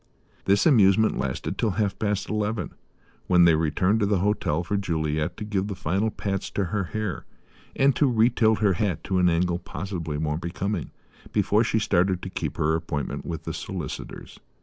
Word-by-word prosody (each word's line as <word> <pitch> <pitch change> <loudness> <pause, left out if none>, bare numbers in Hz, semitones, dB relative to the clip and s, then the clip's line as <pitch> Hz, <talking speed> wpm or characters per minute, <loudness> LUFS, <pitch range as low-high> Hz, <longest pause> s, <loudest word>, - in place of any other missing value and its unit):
This 100 +1 +3
amusement 110 - +5
lasted 65 -1 -3
till 115 - +2
half 100 -3 0
past 105 -2 -1
eleven, 105 +1 -2 0.6
when 90 -1 +5
they 85 - +6
returned 80 +7 +1
to 105 - +2
the 100 -1 +2
hotel 90 -4 0
for 100 - -2
Juliet 80 -3 -1
to 110 - -5
give 100 -2 -1
the 100 - -4
final 95 +7 0
pats 100 -2 -3
to 100 - +1
her 100 -2 0
hair, 105 -1 -4 0.5
and 135 0 +3
to 140 -4 +3
retilt 110 -2 +3
her 100 -3 +4
hat 95 +1 -1
to 95 -1 0
an 90 -1 +4
angle 85 +1 +1
possibly 85 -6 -5
more 75 0 -1
becoming, 95 +4 -3 0.4
before 105 +3 +2
she 110 - 0
started 95 -3 +1
to 95 - -5
keep - - -4
her 80 +1 +2
appointment 80 -4 -3
with 85 -2 -4
the - - -4
solicitors. - - -7
95 Hz, 180 wpm, -25 LUFS, 85-105 Hz, 0.6 s, they